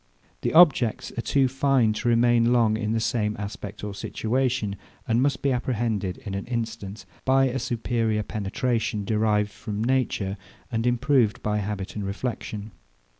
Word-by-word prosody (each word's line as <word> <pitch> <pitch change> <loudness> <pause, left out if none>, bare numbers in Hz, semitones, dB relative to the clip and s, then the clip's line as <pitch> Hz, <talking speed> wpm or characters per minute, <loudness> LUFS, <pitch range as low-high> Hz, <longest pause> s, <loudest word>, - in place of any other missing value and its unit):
The - - -1
objects 145 -10 +5
are 120 - -1
too 135 +2 +2
fine 130 -4 +2
to 120 - -1
remain 120 0 +4
long 115 -3 +3
in 110 -1 -2
the 115 - +1
same 110 -2 0
aspect 100 0 -7
or 105 -1 -4
situation; 115 0 -1 0.3
and 115 +1 +2
must 135 0 0
be 140 - +3
apprehended 115 -7 -1
in 100 - -4
an 100 0 -4
instant, 110 -4 -4 0.2
by 135 0 +4
a 130 +2 -2
superior 115 -2 -1
penetration, 110 +1 -2
derived 105 -1 +1
from 105 -1 -4
nature, 115 -6 0 0.3
and 115 0 0
improved 120 -2 +2
by 105 0 0
habit 100 -2 -4
and 105 - -3
reflexion. 105 0 -4
115 Hz, 155 wpm, -25 LUFS, 105-125 Hz, 0.3 s, objects